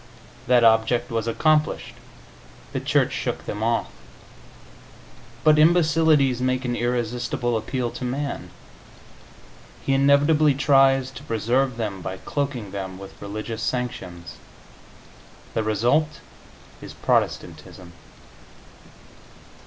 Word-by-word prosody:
That 125 -1 +4
object 115 +2 +3
was 115 0 -2
accomplished; 155 +6 +1 0.8
the - - -1
Church - - +1
shook - - -3
them 105 - -5
off. 115 +1 +1 1.6
But 155 -1 +5
imbecilities 155 -5 +3
make 130 0 0
an 120 -1 -1
irresistible 120 0 -1
appeal 120 +2 -2
to - - -8
man; 140 +3 -4 1.4
he 135 - +1
inevitably 140 +2 +4
tries 135 -1 +3
to 135 - -10
preserve 120 +1 0
them 105 -5 -4
by 95 +1 -5
cloaking 130 -5 -4
them 95 -2 -6
with 100 0 -12
religious 110 +2 -5
sanctions. 95 -9 -4 1.2
The - - 0
result 120 +9 +1 0.6
is - - -10
Protestantism. 90 -2 -2
125 Hz, 100 wpm, -23 LUFS, 110-140 Hz, 1.6 s, But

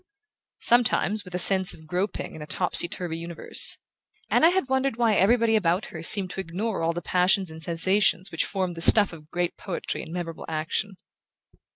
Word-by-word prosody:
Sometimes, 220 -3 +3
with 180 -1 -9
a - - 0
sense 190 0 +5
of 160 - -17
groping 180 +6 -4
in 160 - -10
a 150 - -8
topsy 180 0 +1
turvy 170 -2 -6
universe, 170 0 0 0.5
Anna 325 - +5
had 365 -6 -1
wondered 265 -1 -1
why 230 -2 +2
everybody 225 +3 +2
about 180 -2 0
her 160 - -7
seemed 185 +2 +3
to - - -7
ignore 190 +5 -4
all 165 0 0
the 175 0 -6
passions 185 +1 +1
and 160 0 -11
sensations 185 +3 +1
which 165 - -1
formed 185 -3 -3
the 165 - -8
stuff 205 +1 +5
of 155 -2 -14
great 175 0 -3
poetry 190 -4 -5
and - - -10
memorable 170 -2 -6
action. 160 +5 -3
180 Hz, 185 wpm, -24 LUFS, 165-210 Hz, 0.5 s, sense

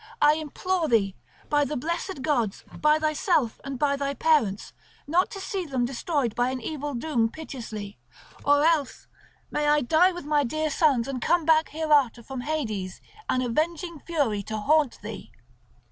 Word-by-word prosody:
I 295 - +6
implore 320 +3 -1
thee 200 -6 +2 0.3
by 295 0 +3
the 290 +2 -2
blessed 335 +1 -3
gods, 240 -9 0
by 300 0 +3
thyself 310 - 0
and 275 -1 -5
by 280 +2 +2
thy 280 0 -2
parents, 230 -11 +1 0.3
not 345 +6 +2
to 395 - -7
see 385 0 -3
them 265 -6 -1
destroyed 265 -1 -1
by 245 +2 +1
an 260 0 -3
evil 290 +2 -4
doom 235 -3 0
piteously; 225 - -8 0.4
or 290 +1 +4
else 315 -5 +1 0.5
may 295 0 0
I 295 0 +4
die 320 +8 +4
with 350 -4 -8
my 295 -1 +2
dear 310 +4 -1
sons 275 -6 +2
and 265 -2 -4
come 340 +3 +2
back 315 0 +4
hereafter 295 -7 +2
from 265 +1 -6
Hades 220 -11 -3 0.3
an 255 - +1
avenging 320 +6 -1
Fury 280 -13 -1
to 220 +2 -5
haunt 290 +4 +2
thee." - - -8
290 Hz, 165 wpm, -26 LUFS, 245-315 Hz, 0.5 s, I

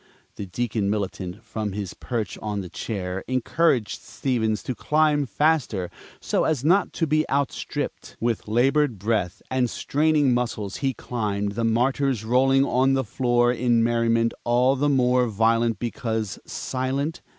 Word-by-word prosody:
The 100 - -6
Deacon 110 0 -1
Militant, 100 -1 -3
from 110 -3 -4
his 100 -2 -4
perch 115 -5 -4
on 105 -2 -3
the 90 - -8
chair, 95 -3 -4
encouraged 130 -1 +1
Stevens 110 -2 -1
to 130 - -3
climb 150 +1 +2
faster 130 - 0 0.3
so - - 0
as 150 -5 0
not 185 +5 +3
to 165 - 0
be 155 0 +2
outstripped. 140 0 -3
With 115 -2 -1
labored 125 +3 +2
breath 100 -3 -1
and 130 -2 +1
straining 150 -1 +2
muscles 110 -5 -2
he 135 -2 -1
climbed, 105 -4 -2
the 115 +3 -3
Martyrs 125 +1 +1
rolling 135 +3 +4
on 130 +1 +2
the 135 0 +1
floor 120 +1 +2
in 120 -1 +2
merriment 115 0 +2
all 125 +3 +3
the 145 +2 +1
more 125 -2 +3
violent 115 +1 +2
because 110 -5 -3
silent. 135 +5 -3
120 Hz, 145 wpm, -24 LUFS, 110-135 Hz, 0.3 s, rolling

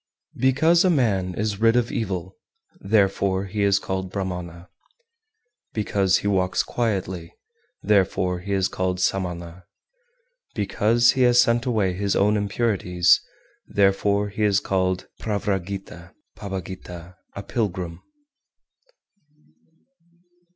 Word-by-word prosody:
388. 130 +1 +1
Because 165 +4 +4
a 185 - +3
man 100 - +1
is 105 -1 -2
rid 115 0 +4
of 120 -1 +1
evil, 95 -4 -3 0.4
therefore 100 -2 +1
he 100 +2 -4
is 100 -1 +4
called 95 -1 -3
Brahmana; 90 -3 -5 1.1
because 100 -3 +1
he - - -3
walks 95 -2 +1
quietly, 95 -7 -3 0.5
therefore 95 -3 +1
he 100 +3 -7
is 95 -1 +2
called 90 -1 -2
Samana; 90 -2 -3 0.9
because 110 +3 +3
he 130 - -1
has 120 -1 +5
sent 120 +1 +3
away 105 -6 +1
his 100 +1 -1
own 105 +2 +3
impurities, 100 -4 +2 0.5
therefore 100 +1 +2
he 100 +2 -6
is 105 -2 +3
called 95 -1 -1 0.2
Pravragita 95 -4 -4 0.2
(Pabbagita, 90 -3 -8 0.2
a 100 - -6
pilgrim). 95 -6 -3
100 Hz, 110 wpm, -23 LUFS, 90-105 Hz, 1.1 s, has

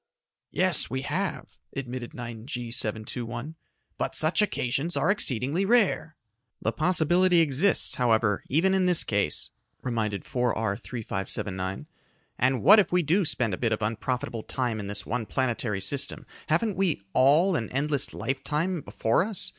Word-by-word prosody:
"Yes, - - +1
we 130 +2 -3
have," 180 +7 -3 0.2
admitted 125 -3 -5
9G 120 0 -6
721, 120 +4 -4 0.5
"but - - -2
such 155 +6 +3
occasions 145 -4 -1
are - - +3
exceedingly 140 - +1
rare." 195 -7 +2 0.4
"The 110 - 0
possibility 175 +3 +3
exists, 160 +5 +3
however, 110 -4 +1
even 175 +7 +3
in 190 -1 +2
this 180 -2 +4
case," 100 -8 -1 0.3
reminded 110 -5 -2
4R 115 -5 0
3579, 95 -4 -4 0.5
"and 130 0 +2
what 210 +7 +8
if 195 - +2
we 180 0 +3
do 175 +7 +2
spend 120 -8 -1
a - - -2
bit 115 -2 +1
of 110 -1 -1
unprofitable 115 +2 -2
time 120 -1 -2
in 100 - -5
this 100 0 -5
one 115 -2 -3
planetary 120 -6 -1
system 130 +9 -2 0.2
haven't 185 +6 +1
we 175 - 0
all 155 +8 +4
an 115 -7 -2
endless 140 +1 0
lifetime 155 +6 -2
before 115 +4 +1
us? 210 -2 -4
130 Hz, 145 wpm, -27 LUFS, 115-165 Hz, 0.5 s, what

